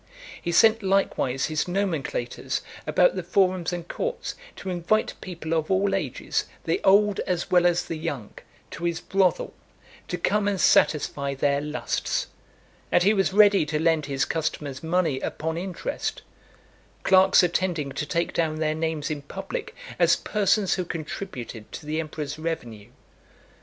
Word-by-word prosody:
He 170 - -2
sent 225 +6 +5
likewise 190 -9 +1
his 155 +1 -1
nomenclators 175 -10 -2 0.3
about - - +4
the - - -2
forums 185 -3 +1
and 175 -1 -5
courts, 485 - -3 0.2
to 190 - -5
invite 180 +5 +1
people 170 -3 -5
of 160 -1 0
all 195 +1 +2
ages, 195 - -1 0.2
the 390 - 0
old 205 +1 +4
as 180 -2 -2
well 175 -1 +5
as 175 0 +1
the 165 - -5
young, 145 -10 -4 0.4
to 170 - -5
his 170 -1 0
brothel, 190 -2 +1 0.5
to - - -3
come 210 -1 +1
and 200 -2 0
satisfy 140 -4 +3
their 140 +1 +1
lusts; 150 0 -2 0.7
and 175 - +4
he 205 +3 +5
was 195 -2 +2
ready 205 -2 +6
to 150 0 -1
lend 160 -2 +2
his 135 -1 0
customers 150 -4 -3
money 160 -4 +1
upon 160 +4 -3
interest; 190 - -4 0.8
clerks 190 0 +6
attending 175 -5 0
to 150 - -3
take 170 0 -1
down 160 -2 0
their 155 -1 0
names 160 -1 -2
in 150 -1 -3
public, 195 +7 -6 0.2
as - - +5
persons 210 -1 +1
who 185 - -1
contributed 150 - -6
to - - -7
the 155 +1 -2
emperor's 155 -2 -5
revenue. 120 -10 -5
170 Hz, 150 wpm, -25 LUFS, 150-190 Hz, 0.8 s, ready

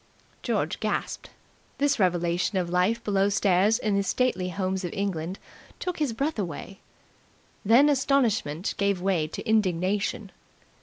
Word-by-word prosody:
George - - -1
gasped. - - -3 0.5
This 280 -2 +1
revelation 175 0 +1
of 175 -2 -1
life 185 +6 +1
below 200 -1 +2
stairs 200 +1 +3
in 210 -2 -1
the 200 - +2
stately 195 -3 0
homes 190 +1 -2
of 175 - -3
England 190 -2 -3 0.4
took 360 -2 -4
his 295 -5 0
breath 275 +3 -2
away. 190 +1 -5 0.8
Then 235 +8 +6
astonishment 245 - +1
gave 200 -2 +1
way 180 -4 0
to 155 - -7
indignation. 200 0 0
195 Hz, 135 wpm, -26 LUFS, 180-225 Hz, 0.8 s, Then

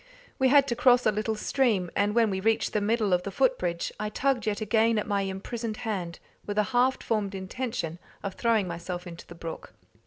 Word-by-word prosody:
We 265 - +4
had 280 +1 +5
to 235 - 0
cross 245 0 +4
a - - +5
little 215 +2 -1
stream, 215 -6 +1
and 205 +1 +1
when 230 -3 +4
we 190 - -1
reached 225 +3 +1
the 210 - +1
middle 215 -2 +1
of 180 - +3
the 200 - -5
foot - - +2
bridge, 170 -1 -2
I 210 0 -2
tugged 255 0 0
yet 205 -1 0
again 220 +1 +2
at 210 - 0
my 200 -1 0
imprisoned 215 +4 -4
hand, 185 -7 -3 0.3
with 205 0 -5
a 210 - +4
half 255 +2 +2
formed 205 -3 -1
intention 190 -4 -4 0.2
of 200 -1 -3
throwing 225 -4 +1
myself 175 +1 -5
into 170 -1 -10
the 170 - -11
brook. 165 -1 -8
210 Hz, 215 wpm, -27 LUFS, 190-235 Hz, 0.3 s, had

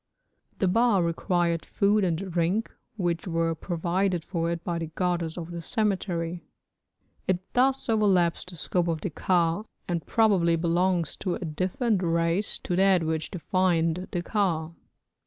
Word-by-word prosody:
The 190 - +1
ba 230 +2 +3
required 170 0 0
food 205 +1 +2
and 170 -3 +1
drink, 175 +6 0 0.3
which 175 -2 -1
were 165 -1 0
provided 175 +2 -1
for 170 -3 -1
it 170 0 -3
by 170 -1 -2
the 165 - -3
goddess 170 0 -2
of 170 0 -6
the 170 0 -5
cemetery. 175 -4 -1 0.8
It 185 0 -2
thus 265 +2 +2
overlaps 195 -6 +2
the 180 - -8
scope 175 +2 -1
of 165 -2 -1
the 190 - -3
ka, 170 +3 +1 0.2
and 170 -2 -2
probably 195 -7 +3
belongs 170 0 +1
to 180 -3 -2
a 180 - -5
different 185 - 0
race 170 +3 +2
to 175 - -1
that 190 -2 +4
which 160 0 -2
defined 180 -1 0
the 175 -2 -2
ka. 170 -6 0
175 Hz, 150 wpm, -27 LUFS, 165-190 Hz, 0.8 s, that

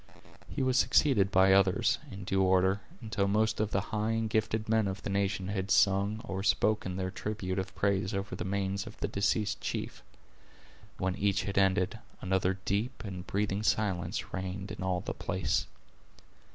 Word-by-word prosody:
He - - -2
was 130 0 +3
succeeded 110 -10 +4
by 95 0 +5
others, 95 -1 +3
in 100 0 -7
due 95 +1 +1
order, 95 +1 +3 0.2
until 110 -3 -1
most 110 +2 +1
of 110 -1 +1
the 100 - +1
high 110 +1 +1
and 115 0 0
gifted 110 0 0
men 110 -2 +2
of 95 0 -4
the - - -3
nation 95 -1 0
had 100 -1 -2
sung 100 +3 +3
or 95 0 -4
spoken 100 -2 +1
their 95 0 -2
tribute 95 -2 -3
of 95 0 -5
praise 100 -1 +1
over 100 0 -3
the - - -4
manes 100 0 -2
of - - -10
the - - -1
deceased 100 +1 0
chief. - - -4 1.0
When 95 0 -1
each 100 -1 +1
had 100 +1 0
ended, 95 +2 +2 0.2
another 95 0 0
deep 115 +6 -1
and 95 -3 -7
breathing 100 0 -1
silence 100 -5 -1
reigned 95 +1 -4
in 105 - -7
all 90 -1 0
the - - -4
place. 90 -4 -1
100 Hz, 175 wpm, -31 LUFS, 95-105 Hz, 1.0 s, by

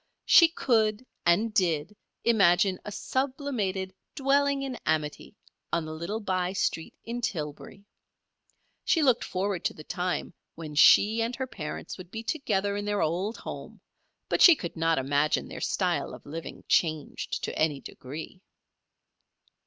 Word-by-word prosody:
She 335 - +8
could, 225 -7 +1 0.2
and 210 +6 +3
did, 175 -2 +1 0.3
imagine 190 -4 +4
a 210 - -6
sublimated 230 -7 -2 0.2
"dwelling 280 0 +2
in 265 -2 -4
amity" 150 -2 -2 0.4
on 170 -2 0
the 155 - -6
little 170 +7 -4
by 185 -3 -1
street 165 -4 -2
in 235 +1 -5
Tillbury. 160 +1 -5 1.0
She 325 - +2
looked 255 -4 +3
forward 190 0 -2
to - - 0
the 155 - -10
time 180 +2 -3 0.2
when 155 -2 -8
she 210 +9 +6
and 235 +2 -1
her 260 - -3
parents 165 -8 -7
would 180 -1 -10
be 225 +4 -6
together 205 -8 -1
in 205 0 -3
their 205 0 0
old 185 +8 -1
home; - - -8 0.5
but - - 0
she 345 - +10
could 170 - -6
not 165 0 +1
imagine 145 +3 +1
their - - -8
style 175 -7 -1
of - - -16
living 160 +3 -7
changed 155 -3 0
to - - -3
any 155 -3 +1
degree. 155 +8 -9
190 Hz, 145 wpm, -28 LUFS, 165-230 Hz, 1.0 s, she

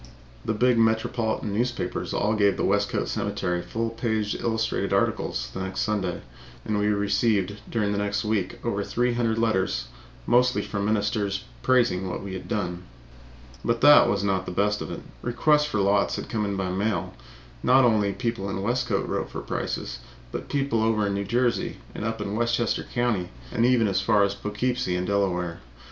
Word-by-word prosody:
The 110 - -1
big 125 +1 +3
metropolitan 110 -1 +1
newspapers 120 +4 -2
all 105 +1 +1
gave 100 -2 +3
the - - 0
Westcote 100 +1 +1
Cemetery 90 0 -1
full 115 +4 -3
page 110 -2 -1
illustrated 115 -1 -1
articles - - 0
the - - -5
next 95 0 -3
Sunday, 100 -5 -1 0.4
and 105 -1 0
we 105 - +1
received 100 -1 +1
during 105 -3 0
the 100 - 0
next 100 +1 -1
week 105 -4 -1
over 100 -3 0
three 120 +4 0
hundred 115 -2 0
letters, 95 - 0 0.4
mostly 125 +1 +3
from 100 -1 -3
ministers, 105 -1 0 0.2
praising 120 -8 +2
what 90 - -4
we 100 -1 -6
had 95 - -6
done. 90 -4 -2 0.8
But 115 0 0
that 145 -4 +8
was 100 -3 0
not 95 -2 0
the - - -3
best 105 +3 +1
of - - -5
it. - - -6 0.2
Requests 150 +5 +3
for 150 - -2
lots 100 +1 +2
began - - -5
to - - -11
come 110 -2 0
in 100 -1 -2
by 95 -1 -1
mail. 100 +3 -1 0.5
Not 130 0 +5
only 105 -4 +3
people 115 -3 -3
in 95 0 -3
Westcote 120 -2 0
wrote - - -2
for - - -6
prices, - - -4 0.3
but - - -6
people 135 -5 0
away 110 - +3
over 110 -2 +1
in 100 - 0
New 100 0 -2
Jersey 120 +3 0 0.2
and - - -5
up 115 +1 -2
in 100 - -3
Westchester 115 0 +1
Country, 120 -8 -1 0.2
and 115 +1 +2
even 125 -3 +4
from 100 - +1
as 95 0 +1
far 105 +2 +2
away - - +6
as 100 - -1
Poughkeepsie 105 0 -1
and 90 0 -1
Delaware. 90 -4 0
105 Hz, 190 wpm, -25 LUFS, 100-115 Hz, 0.8 s, that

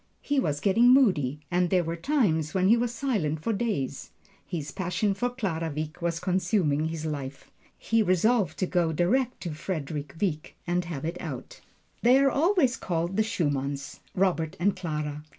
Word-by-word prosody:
He 285 -1 +1
was 145 - -1
getting 230 +5 +5
moody, 160 - +3
and 180 0 +2
there 180 -1 +3
were 165 +1 -3
times 170 - +1
when 190 0 +3
he 230 - +7
was 240 0 0
silent 215 - -1
for 230 - 0
days. 195 - -2 0.4
His 155 -6 -4
passion 190 - 0
for 245 +6 -1
Clara 185 -10 -2
Wieck 155 +3 -5
was 170 -1 -1
consuming 180 -5 +1
his 160 -1 -4
life. 140 -3 -5 0.3
He 225 0 +1
resolved 195 -2 +2
to 185 - +1
go 175 -3 +1
direct 245 - +1
to 170 -4 -4
Frederick 150 -3 -4
Wieck 155 -7 -2
and 175 0 0
have 160 -4 -5
it 170 +2 -3
out. - - -7 0.4
They 245 +3 +6
are 275 0 +4
always 310 -4 +2
called 170 +1 -2
"the 220 - +3
Schumanns" 140 -9 -2 0.2
Robert 175 -4 0
and 195 +3 +2
Clara. 150 -4 -4
175 Hz, 170 wpm, -27 LUFS, 155-220 Hz, 0.4 s, he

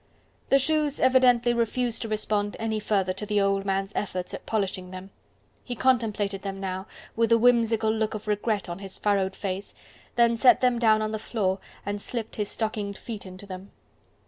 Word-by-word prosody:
The 275 - +6
shoes 295 +1 +1
evidently 250 -2 +4
refused 235 0 0
to 225 - -2
respond 210 -1 -1
any 220 -1 -1
further 195 -3 0
to 190 - -5
the 210 0 +1
old 195 0 +1
man's 195 0 -1
efforts 185 -3 -3
at - - -8
polishing 190 -4 -2
them. 185 +1 -9 0.5
He 245 - -5
contemplated 215 -6 +1
them 195 0 -5
now, 190 +1 -4 0.3
with 230 0 +1
a 230 - +7
whimsical 230 -2 +3
look 220 0 -1
of 215 0 -7
regret 210 0 0
on 175 +1 -6
his 195 -1 -6
furrowed 195 -2 +1
face, 195 0 -4 0.4
then 235 -1 +4
set 245 +1 +6
them 250 -2 +2
down 215 -2 +4
on 215 - -2
the 220 - -3
floor 195 -4 -1 0.3
and 205 0 -3
slipped 230 -1 -5
his 210 -2 -1
stockinged 210 -2 -2
feet 215 -4 -7
into 185 +2 -10
them. 190 0 -9
215 Hz, 185 wpm, -26 LUFS, 195-230 Hz, 0.5 s, a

